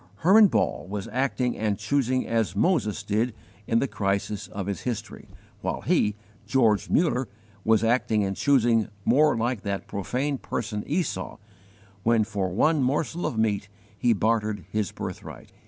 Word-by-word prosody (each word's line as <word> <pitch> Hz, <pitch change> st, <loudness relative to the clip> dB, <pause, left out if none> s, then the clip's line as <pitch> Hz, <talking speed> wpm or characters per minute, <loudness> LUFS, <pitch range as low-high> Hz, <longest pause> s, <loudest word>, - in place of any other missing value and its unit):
Hermann 205 Hz, +5 st, +7 dB
Ball 135 Hz, -, 0 dB
was 100 Hz, -1 st, -4 dB
acting 125 Hz, -1 st, 0 dB
and 105 Hz, -2 st, -1 dB
choosing 130 Hz, +3 st, 0 dB
as 115 Hz, -3 st, 0 dB
Moses 105 Hz, -, +1 dB
did 110 Hz, +3 st, 0 dB, 0.3 s
in 115 Hz, -, +2 dB
the 135 Hz, -, +2 dB
crisis 100 Hz, -1 st, -2 dB
of 100 Hz, -1 st, -5 dB
his 100 Hz, 0 st, -3 dB
history, 120 Hz, -4 st, -5 dB, 0.3 s
while -, -, -2 dB
he, 105 Hz, -1 st, +2 dB, 0.3 s
George 110 Hz, -6 st, +2 dB
Muller, 135 Hz, -7 st, +2 dB, 0.4 s
was 110 Hz, -1 st, +3 dB
acting 115 Hz, -2 st, +2 dB
and 95 Hz, 0 st, -2 dB
choosing 120 Hz, -5 st, +3 dB, 0.2 s
more 150 Hz, +3 st, +4 dB
like 115 Hz, -1 st, -1 dB
that 100 Hz, -1 st, -3 dB
profane 130 Hz, +7 st, -2 dB
person 105 Hz, -2 st, -3 dB
Esau, 150 Hz, -, -2 dB, 0.6 s
when 115 Hz, +1 st, +3 dB
for 100 Hz, -4 st, -2 dB
one 150 Hz, -, +2 dB
morsel 150 Hz, +6 st, 0 dB
of 115 Hz, -, -4 dB
meat 105 Hz, -3 st, 0 dB, 0.3 s
he 120 Hz, +3 st, +2 dB
bartered 110 Hz, 0 st, 0 dB
his 105 Hz, -4 st, -1 dB
birthright. -, -, -8 dB
115 Hz, 150 wpm, -26 LUFS, 105-130 Hz, 0.6 s, Hermann